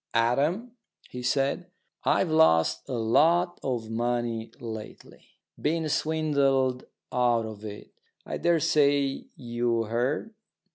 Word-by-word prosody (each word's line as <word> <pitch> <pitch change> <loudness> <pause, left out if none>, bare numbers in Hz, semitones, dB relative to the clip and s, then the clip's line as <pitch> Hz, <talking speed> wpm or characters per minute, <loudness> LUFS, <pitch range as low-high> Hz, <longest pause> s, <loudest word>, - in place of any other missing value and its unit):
"Adam," 145 - +1 0.4
he 125 - -6
said, 140 +7 0 0.3
"I've 170 - +2
lost 80 - +3
a - - -3
lot 165 +10 +3
of 120 -4 -3
money 120 -1 -1
lately. 110 -2 -9 0.3
Been 160 +1 0
swindled 140 -5 +1 0.3
out 120 -2 +2
of 110 -1 -8
it. 105 -1 -8 0.3
I - - -4
daresay 145 -4 +2
you 120 -1 -1
heard?" 125 - -1
125 Hz, 105 wpm, -27 LUFS, 115-155 Hz, 0.4 s, lost